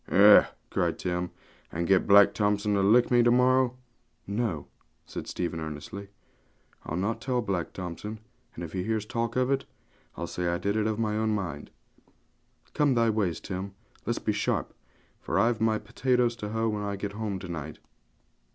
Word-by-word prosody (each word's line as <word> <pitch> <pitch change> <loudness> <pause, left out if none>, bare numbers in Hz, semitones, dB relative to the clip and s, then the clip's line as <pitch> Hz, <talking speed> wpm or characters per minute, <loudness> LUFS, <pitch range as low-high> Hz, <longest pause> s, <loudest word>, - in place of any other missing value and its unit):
'Eh!' 105 +2 +8 0.2
cried - - 0
Tim; 90 0 -2 0.4
'and 85 +1 -2
get 95 +1 +3
Black 100 0 +7
Thompson 105 0 +1
to 100 - +2
lick 115 +6 +4
me 120 -1 +6
to 120 - +4
morrow?' 125 0 +3 0.5
'No,' 100 -8 -2 0.4
said - - -7
Stephen 85 -2 -3
earnestly, 80 +6 -7 0.8
'I'll 85 - -3
not 110 +5 -1
tell 130 -1 0
Black 95 -5 -2
Thompson; 95 +4 -6 0.4
and 85 - -6
if 80 - -7
he 95 - -1
hears 110 +2 -1
talk 115 +1 -2
of 130 +1 +2
it, 135 - 0 0.5
I'll - - -3
say 90 -1 -3
I 85 0 +1
did 100 +3 -1
it 110 0 +1
of 110 -1 -1
my 110 -2 0
own 110 0 +1
mind. 85 -8 -4 1.0
Come 145 -3 +3
thy 115 -1 +3
ways, 95 -7 0
Tim; 95 0 -6 0.3
let's - - 0
be - - -1
sharp, - - -1 0.5
for 85 - -2
I've 115 +2 +2
my 110 -1 +3
potatoes 125 0 +1
to 105 -3 -5
hoe 110 +1 0
when 105 -1 -2
I 100 0 -2
get 100 +1 -4
home 105 -2 -3
to 90 0 -8
night.' 80 -3 -6
105 Hz, 180 wpm, -28 LUFS, 90-115 Hz, 1.0 s, Eh